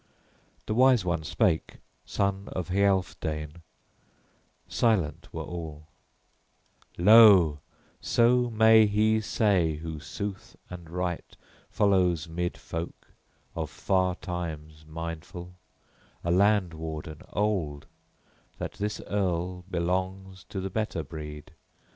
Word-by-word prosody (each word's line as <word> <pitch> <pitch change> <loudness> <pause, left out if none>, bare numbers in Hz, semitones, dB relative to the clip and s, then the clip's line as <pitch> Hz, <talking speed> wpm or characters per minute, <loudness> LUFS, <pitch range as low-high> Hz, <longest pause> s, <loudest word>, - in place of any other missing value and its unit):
The - - -2
wise 125 -3 +4
one 85 -2 0
spake, 80 +1 0 0.3
son 100 0 -1
of 90 -1 -4
Healfdene; 90 -5 0 1.1
silent 105 -10 0
were - - -5
all: 80 -3 -7 1.1
"Lo, 95 -6 +7 0.4
so 120 +1 +3
may 110 -1 +6
he 110 +1 +2
say 95 -7 +1
who 80 0 -6
sooth 100 +5 -6 0.2
and 85 -2 -9
right 90 0 -4 0.3
follows 90 -5 +2
'mid 85 +2 -3
folk, 85 +1 -7 0.4
of - - -4
far 95 -1 0
times 80 -3 -6
mindful, 85 +3 -7 0.7
a 85 - 0
land 100 -1 +3
warden 80 -1 -6
old, 90 -9 -1 0.7
{24a} - - -36
that - - -5
this 105 +1 -3
earl 90 -2 -1
belongs 95 +2 -2
to 95 - -6
the 95 0 -4
better 105 -5 -2
breed! 75 0 -8
90 Hz, 105 wpm, -27 LUFS, 80-100 Hz, 1.1 s, Lo